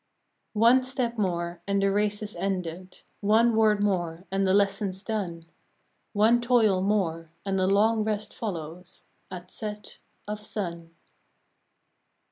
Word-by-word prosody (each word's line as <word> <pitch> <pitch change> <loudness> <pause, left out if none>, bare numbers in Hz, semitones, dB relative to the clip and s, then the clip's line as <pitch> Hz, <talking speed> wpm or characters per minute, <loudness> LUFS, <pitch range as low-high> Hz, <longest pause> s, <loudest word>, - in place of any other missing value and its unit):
One 235 +4 +6
step 255 -3 -2
more, 175 -3 -2
and 200 0 +1
the 195 0 +2
race 205 +1 0
is 210 - -6
ended, 185 -1 -4 0.2
One 220 +3 +3
word 215 -2 +3
more, 175 -3 -1
and 195 0 +1
the 190 - +3
lesson's 200 -1 +1
done, 190 -7 -3 0.7
One 225 +3 +4
toil 225 -6 +3
more, 175 -5 0 0.2
and 195 -1 0
a 185 - +2
long 215 +3 +3
rest 210 -1 -3
follows 175 -4 -7 0.2
At 180 -1 -9
set 210 -2 -6 0.3
of 210 0 -4
sun. 170 -6 -5
200 Hz, 130 wpm, -27 LUFS, 180-215 Hz, 0.7 s, One